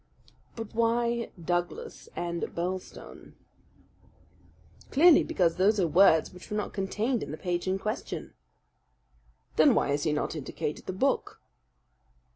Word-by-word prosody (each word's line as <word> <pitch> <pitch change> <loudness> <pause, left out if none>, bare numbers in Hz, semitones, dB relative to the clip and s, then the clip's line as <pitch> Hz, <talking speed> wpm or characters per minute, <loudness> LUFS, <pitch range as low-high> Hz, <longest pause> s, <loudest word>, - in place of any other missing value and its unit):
"But 225 -2 -7
why 235 +1 +1
'Douglas' 175 +1 -3
and 170 0 -3
'Birlstone'?" 180 +2 -6 1.5
"Clearly 320 +3 +6
because 170 -3 +1
those 205 +3 +3
are 180 - +3
words 160 -1 +4
which 180 - -13
were 210 - -2
not 210 - -3
contained 210 +5 -1
in - - -5
the 155 - -5
page 175 +1 -2
in 190 +1 +1
question." 215 +3 -5 1.2
"Then 275 -6 +6
why - - +1
has 145 +1 0
he 155 - +1
not 150 +2 -2
indicated 150 0 -5
the - - -3
book?" 270 +9 0
190 Hz, 130 wpm, -28 LUFS, 170-225 Hz, 1.5 s, Clearly